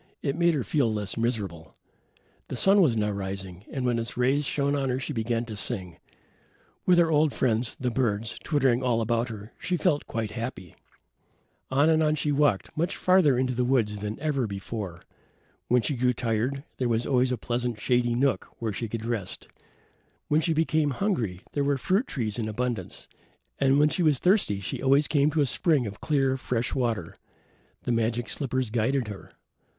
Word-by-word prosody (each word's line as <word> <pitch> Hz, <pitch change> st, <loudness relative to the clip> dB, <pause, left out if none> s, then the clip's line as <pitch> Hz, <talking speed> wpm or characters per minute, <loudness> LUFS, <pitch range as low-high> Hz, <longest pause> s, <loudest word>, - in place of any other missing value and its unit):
It 140 Hz, -1 st, 0 dB
made 170 Hz, -1 st, +3 dB
her 135 Hz, -, -1 dB
feel 135 Hz, -5 st, +1 dB
less 105 Hz, -2 st, -3 dB
miserable. 105 Hz, -9 st, -3 dB, 0.7 s
The -, -, -5 dB
sun 195 Hz, +9 st, +5 dB
was 130 Hz, -10 st, +3 dB
now 105 Hz, -1 st, +1 dB
rising 95 Hz, -1 st, -5 dB
and 130 Hz, -2 st, -3 dB
when 120 Hz, -1 st, +1 dB
its 115 Hz, +1 st, -5 dB
rays 135 Hz, +4 st, +2 dB
shone 140 Hz, +1 st, 0 dB
on 135 Hz, -2 st, 0 dB
her 125 Hz, +1 st, 0 dB
she 150 Hz, -, -4 dB
began 115 Hz, 0 st, -1 dB
to 110 Hz, -2 st, -7 dB
sing. 95 Hz, -5 st, -4 dB, 0.9 s
With 180 Hz, -1 st, +6 dB
her 170 Hz, -2 st, +4 dB
old 150 Hz, -1 st, +3 dB
friends, 115 Hz, -1 st, 0 dB
the 125 Hz, -1 st, -1 dB
birds, 115 Hz, -2 st, -1 dB
twittering 135 Hz, -4 st, +2 dB
all 125 Hz, -3 st, +1 dB
about 115 Hz, +1 st, 0 dB
her, 105 Hz, -1 st, -9 dB
she 180 Hz, -, -1 dB
felt 155 Hz, -3 st, +1 dB
quite 110 Hz, -2 st, -3 dB
happy. 115 Hz, -7 st, -6 dB, 0.9 s
On 140 Hz, +3 st, +3 dB
and 160 Hz, 0 st, +4 dB
on 155 Hz, -1 st, +2 dB
she 150 Hz, 0 st, -1 dB
walked, 145 Hz, -8 st, +1 dB
much 170 Hz, +5 st, -1 dB
farther 180 Hz, -8 st, +4 dB
into 130 Hz, 0 st, 0 dB
the 125 Hz, +1 st, 0 dB
woods 115 Hz, -5 st, +1 dB
than 105 Hz, +1 st, -4 dB
ever 140 Hz, -5 st, 0 dB
before. 100 Hz, -3 st, -6 dB, 0.6 s
When 125 Hz, -1 st, +3 dB
she 145 Hz, -, 0 dB
grew 125 Hz, 0 st, +2 dB
tired 125 Hz, +4 st, -1 dB
there 125 Hz, -2 st, 0 dB
was 115 Hz, 0 st, +1 dB
always 130 Hz, -1 st, +2 dB
a 125 Hz, -, 0 dB
pleasant 120 Hz, -2 st, -2 dB
shady 120 Hz, +1 st, +1 dB
nook 135 Hz, +1 st, +1 dB
where 110 Hz, -3 st, -3 dB
she 115 Hz, +3 st, -4 dB
could 115 Hz, 0 st, -4 dB
rest; 115 Hz, -6 st, -4 dB, 0.8 s
when 150 Hz, +2 st, +3 dB
she 165 Hz, -, 0 dB
became 155 Hz, -1 st, +2 dB
hungry, 125 Hz, -, -1 dB
there 145 Hz, -, 0 dB
were 140 Hz, 0 st, +1 dB
fruit 195 Hz, -, +1 dB
trees 115 Hz, -5 st, -3 dB
in 110 Hz, -, -1 dB
abundance; 110 Hz, -3 st, -3 dB, 0.5 s
and 135 Hz, 0 st, +4 dB
when 150 Hz, +1 st, +5 dB
she 180 Hz, -, -1 dB
was 155 Hz, -5 st, +4 dB
thirsty 180 Hz, -, +2 dB
she 100 Hz, -, -5 dB
always 140 Hz, +2 st, +4 dB
came 145 Hz, -1 st, +3 dB
to 155 Hz, 0 st, +1 dB
a -, -, +4 dB
spring 145 Hz, 0 st, +1 dB
of 105 Hz, 0 st, -7 dB
clear, 135 Hz, -3 st, +1 dB
fresh 120 Hz, -2 st, -2 dB
water. 115 Hz, -10 st, -2 dB, 0.7 s
The -, -, -1 dB
magic 115 Hz, 0 st, 0 dB
slippers 130 Hz, -4 st, -1 dB
guided 120 Hz, +2 st, 0 dB
her. 100 Hz, -2 st, -9 dB
125 Hz, 190 wpm, -27 LUFS, 110-145 Hz, 0.9 s, With